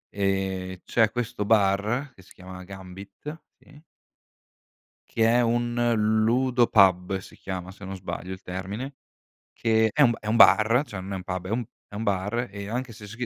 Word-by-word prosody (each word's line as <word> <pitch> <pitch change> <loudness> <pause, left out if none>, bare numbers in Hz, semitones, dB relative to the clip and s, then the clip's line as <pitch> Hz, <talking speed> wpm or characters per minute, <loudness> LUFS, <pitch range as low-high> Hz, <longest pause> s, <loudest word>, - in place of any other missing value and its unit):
ehm, 95 -2 -1
c'è 115 -2 +2
questo 115 -4 -3
bar 105 +6 +2
che - - -16
si 95 - -18
chiama 95 0 -10
Gambit, 95 - -10 0.2
sì 145 0 -18 1.3
che 115 - +1
è 120 +2 +4
un 120 0 0 0.5
ludo 125 +1 +3
pub, 95 -2 +4
si 95 - -12
chiama 95 -1 -6
se 100 - -15
non 95 - -5
sbaglio 95 0 -6
il 95 0 -7
termine, 100 +9 -6 0.6
che 110 -1 +2
è 150 - +2
un 120 -5 +6
è 105 - -9
un 110 - +1
bar, 115 +4 +6
cioè 100 -6 -7
non 95 +1 -6
è - - -2
un 90 - -6
pub, 90 0 -4
è - - -6
un 120 +3 -1 0.2
è - - -12
un 105 - -3
bar 105 +4 -1
e 100 0 -7
anche 125 +2 -3
se 105 -1 -11
c'è 105 - -11
105 Hz, 185 wpm, -26 LUFS, 95-120 Hz, 1.3 s, un